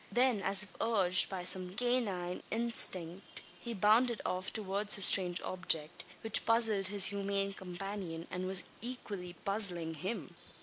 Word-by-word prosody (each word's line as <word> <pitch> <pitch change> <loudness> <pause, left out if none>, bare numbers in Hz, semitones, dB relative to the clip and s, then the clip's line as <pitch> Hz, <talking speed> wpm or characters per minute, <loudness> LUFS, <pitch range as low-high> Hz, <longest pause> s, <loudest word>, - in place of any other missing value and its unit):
Then, 245 -4 0
as 195 +1 +3
if 205 - -12
urged 195 -5 +1
by 185 -2 -6
some 185 0 -1
canine 205 -7 -3
instinct, 195 -6 -1 0.2
he 235 -1 -7
bounded 220 +4 +1
off 185 +1 -4
towards 205 0 +1
the 200 - -1
strange 180 -2 +7
object, 165 -4 -1 0.2
which 225 -2 +3
puzzled 225 -4 +2
his 200 0 +3
human 200 0 -3
companion, 185 -2 -8
and 185 0 -5
was 190 -1 +5 0.2
equally 205 -7 -7
puzzling 180 -5 -1
him. 185 - -7
195 Hz, 140 wpm, -31 LUFS, 180-215 Hz, 0.2 s, strange